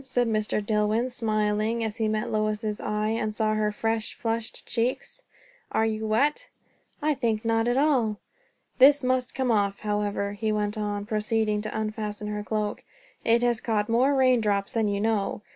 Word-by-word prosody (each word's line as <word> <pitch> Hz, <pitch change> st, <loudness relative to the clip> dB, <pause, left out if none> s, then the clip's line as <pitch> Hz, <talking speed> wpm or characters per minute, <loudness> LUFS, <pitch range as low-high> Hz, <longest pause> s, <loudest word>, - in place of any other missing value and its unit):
said 245 Hz, -2 st, 0 dB
Mr. 215 Hz, -1 st, -1 dB
Dillwyn, 215 Hz, +3 st, +1 dB
smiling, 215 Hz, 0 st, 0 dB
as 220 Hz, 0 st, -3 dB
he 220 Hz, -2 st, 0 dB
met 215 Hz, 0 st, -1 dB
Lois's 215 Hz, 0 st, -1 dB
eyes, 215 Hz, +2 st, -1 dB
and 215 Hz, 0 st, -2 dB
saw 215 Hz, -1 st, +1 dB
her 215 Hz, -1 st, +1 dB
fresh, 225 Hz, +1 st, -2 dB
flushed 225 Hz, -1 st, -3 dB
cheeks. 245 Hz, -, -2 dB, 0.5 s
"Are 220 Hz, -, +2 dB
you 220 Hz, 0 st, -2 dB
wet?" 290 Hz, -, +1 dB, 0.5 s
"I 305 Hz, 0 st, +3 dB
think 230 Hz, -5 st, -1 dB
not 225 Hz, 0 st, +2 dB
at 245 Hz, +1 st, +1 dB
all." 260 Hz, -8 st, +2 dB, 0.6 s
"This 280 Hz, +2 st, +7 dB
must 255 Hz, -1 st, 0 dB
come 260 Hz, -2 st, +1 dB
off, 200 Hz, -2 st, +1 dB
however," 205 Hz, -1 st, -1 dB
he 215 Hz, +1 st, -1 dB
went 210 Hz, 0 st, -1 dB
on, 205 Hz, -1 st, -3 dB
proceeding 215 Hz, -1 st, 0 dB
to 215 Hz, 0 st, -4 dB
unfasten 215 Hz, -1 st, -4 dB
her 210 Hz, 0 st, -3 dB
cloak; 210 Hz, -1 st, -2 dB, 0.4 s
"it 235 Hz, +1 st, +3 dB
has 240 Hz, -2 st, +1 dB
caught 215 Hz, -2 st, 0 dB
more 255 Hz, +5 st, +3 dB
rain 255 Hz, -3 st, +4 dB
drops 200 Hz, -2 st, 0 dB
than 225 Hz, -2 st, +1 dB
you 200 Hz, -1 st, -1 dB
know." 210 Hz, -1 st, -1 dB
220 Hz, 175 wpm, -26 LUFS, 210-230 Hz, 0.6 s, This